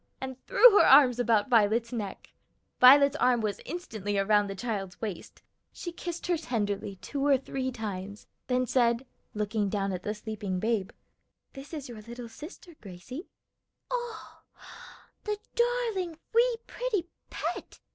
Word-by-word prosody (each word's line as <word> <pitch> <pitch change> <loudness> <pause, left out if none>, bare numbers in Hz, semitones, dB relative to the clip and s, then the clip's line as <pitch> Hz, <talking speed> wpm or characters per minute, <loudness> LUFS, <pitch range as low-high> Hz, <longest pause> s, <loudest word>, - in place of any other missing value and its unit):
and 260 -1 -7
threw 480 +3 +8
her - - +7
arms 250 -4 +7
about 230 -4 +2
Violet's 230 0 +2
neck. 210 -5 -6 0.5
Violet's 280 +2 +8
arm 250 -3 +3
was 210 -3 -2
instantly 220 - -4
around 205 +1 +3
the 195 - -5
child's 195 -4 -4
waist; 205 -6 -7 0.3
she 345 - -6
kissed 345 0 -6
her 345 -2 +1
tenderly 205 -8 -2
two 280 -1 -3
or 280 -1 +5
three 260 0 -4
times, 205 -3 -6 0.2
then 255 0 +1
said, 240 0 +2 0.3
looking 210 -1 -1
down 195 -1 -1
at 180 - -4
the 210 +3 -3
sleeping 210 -3 -4
babe, 215 -2 0 0.6
"This 270 +1 -10
is 300 -4 -6
your 230 -3 -9
little 235 +2 -9
sister, 315 +7 -11
Gracie." 210 - -9 0.6
"Oh, 480 -2 -5 0.8
the 420 -1 -2 0.2
darling, 465 -9 0 0.2
wee, 475 +1 +3
pretty 450 -8 -2 0.2
pet!" - - -5
240 Hz, 145 wpm, -29 LUFS, 205-300 Hz, 0.8 s, threw